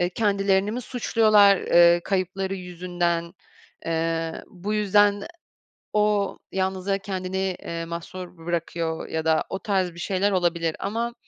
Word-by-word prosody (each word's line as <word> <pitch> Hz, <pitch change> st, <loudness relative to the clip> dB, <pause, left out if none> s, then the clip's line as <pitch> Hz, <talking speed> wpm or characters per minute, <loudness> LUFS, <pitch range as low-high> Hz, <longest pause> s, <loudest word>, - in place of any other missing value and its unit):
eee, 175 Hz, -, +2 dB
kendilerini 200 Hz, -1 st, +1 dB
mi 250 Hz, -, -3 dB
suçluyorlar, 215 Hz, -4 st, +4 dB
eee, 170 Hz, 0 st, +5 dB
kayıpları 190 Hz, 0 st, -1 dB
yüzünden? 175 Hz, -2 st, -2 dB, 0.5 s
Eee, 165 Hz, 0 st, -1 dB
bu 205 Hz, +1 st, -4 dB
yüzden 205 Hz, 0 st, +3 dB
e -, -, -7 dB, 0.7 s
o 210 Hz, -1 st, +1 dB
yalnızlığa 190 Hz, +1 st, -1 dB
kendini, 190 Hz, -1 st, -4 dB, 0.2 s
eee, 165 Hz, 0 st, -5 dB
mahsur 175 Hz, +1 st, -7 dB
bırakıyor 165 Hz, -1 st, -3 dB
ya 160 Hz, 0 st, -3 dB
da 160 Hz, -1 st, +3 dB
o 195 Hz, -, -4 dB
tarz 185 Hz, -3 st, 0 dB
bir 170 Hz, -, -12 dB
şeyler 195 Hz, +2 st, 0 dB
olabilir. 170 Hz, -3 st, 0 dB
Ama, 230 Hz, +4 st, -2 dB
185 Hz, 135 wpm, -24 LUFS, 170-200 Hz, 0.7 s, eee